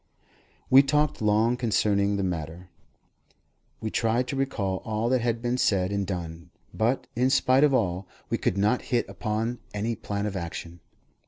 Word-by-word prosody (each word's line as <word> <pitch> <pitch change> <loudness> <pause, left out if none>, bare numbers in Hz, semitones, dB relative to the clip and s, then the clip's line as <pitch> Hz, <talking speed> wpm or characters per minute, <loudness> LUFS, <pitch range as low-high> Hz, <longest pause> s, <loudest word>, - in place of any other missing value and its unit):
We 135 +1 +9
talked 150 +1 +1
long 110 +3 +2
concerning 100 -4 +1
the 100 - -1
matter; 85 0 -4 1.1
we 110 - -4
tried 115 +2 +1
to - - -2
recall 105 -9 -1
all 110 +3 -2
that 130 -1 +2
had 115 0 -1
been 120 +1 0
said 95 -4 +2
and 100 -1 -1
done; 85 -3 -5 0.2
but, 115 +4 0
in 125 +2 +2
spite 135 0 +4
of 150 - +5
all, 95 -7 0 0.2
we - - -1
could 95 - 0
not 105 +5 +2
hit 120 -3 +1
upon 115 +2 -3 0.2
any 110 +3 -1
plan 100 -1 -4
of 105 -2 -3
action. 85 -1 -6
110 Hz, 165 wpm, -26 LUFS, 95-125 Hz, 1.1 s, We